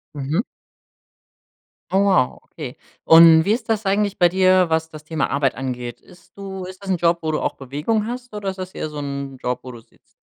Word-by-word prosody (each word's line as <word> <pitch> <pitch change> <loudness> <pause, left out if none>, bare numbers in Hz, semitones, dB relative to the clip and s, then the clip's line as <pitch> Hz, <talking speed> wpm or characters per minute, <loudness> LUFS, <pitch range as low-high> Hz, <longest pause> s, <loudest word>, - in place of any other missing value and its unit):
Mhm. 150 - -1 1.5
Oh 190 - +3
wow, 185 -10 +2
okay. 140 -6 -9 0.3
Und, 165 0 +8
wie 205 - +2
ist 240 +1 -4
das 220 -1 0
eigentlich 200 +1 +1
bei 175 - +5
dir, 185 0 +3
was 160 0 0
das 155 -1 -11
Thema 155 0 -2
Arbeit 140 -2 +1
angeht? 125 -2 -5
Ist 180 - -20
du 195 -1 -7
ist 185 +1 -10
das 195 - -8
'n 185 - +2
Job, 170 0 +2
wo 160 -1 -1
du - - -1
auch - - -1
Bewegung 150 - -2
hast 245 0 -7
oder 205 -2 -3
ist 190 - -6
das 185 0 -7
eher 155 - -4
so 150 - -9
'n 140 -2 -5
Job, 125 0 -2
wo 130 - -9
du 120 -2 -11
sitzt? - - -31
170 Hz, 215 wpm, -21 LUFS, 140-195 Hz, 1.5 s, Und